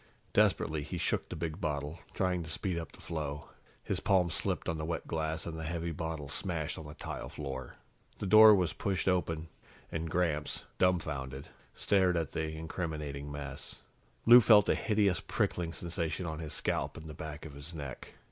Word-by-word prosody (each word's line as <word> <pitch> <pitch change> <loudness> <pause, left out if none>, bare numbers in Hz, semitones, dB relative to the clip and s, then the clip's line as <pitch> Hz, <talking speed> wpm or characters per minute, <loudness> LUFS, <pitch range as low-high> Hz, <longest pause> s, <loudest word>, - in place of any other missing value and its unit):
Desperately, 80 -1 +3
he 75 - -5
shook - - 0
the - - -5
big 80 -2 -4
bottle, 75 0 -2 0.2
trying 90 -2 +1
to 80 - -6
speed 85 +1 -2
up 80 - -7
the - - -16
flow. 75 -3 -4 0.3
His - - -1
palms 90 -4 +3
slipped - - -1
on 80 -1 -1
the - - -2
wet 80 +1 -3
glass, 80 0 -2
and 85 - -4
the - - -4
heavy 85 +1 -2
bottle 80 -2 -4
smashed 80 0 -2
on 80 - -8
the 75 - -9
tile - - -5
floor. 65 -3 -6 0.4
The - - -4
door 110 +2 +9
was 90 -4 +1
pushed 95 -2 -1
open, 85 -3 +1 0.4
and 80 0 -2
Gramps, 80 -3 0
dumbfounded, 75 -7 0 0.3
stared 95 -3 +3
at 80 -4 -1
the 80 -1 -2
incriminating 75 -3 -4
mess. 70 -1 -7 0.4
Lou 120 +2 +10
felt 105 -3 +7
a - - +6
hideous 105 -4 +2
prickling 85 -2 -1
sensation 85 0 -3
on 80 -1 -4
his 80 -3 -5
scalp - - -1
and 80 - -9
the 75 - -7
back 75 0 -7
of 75 - -8
his 75 +4 -9
neck. 70 -5 -7
80 Hz, 185 wpm, -32 LUFS, 75-90 Hz, 0.4 s, Lou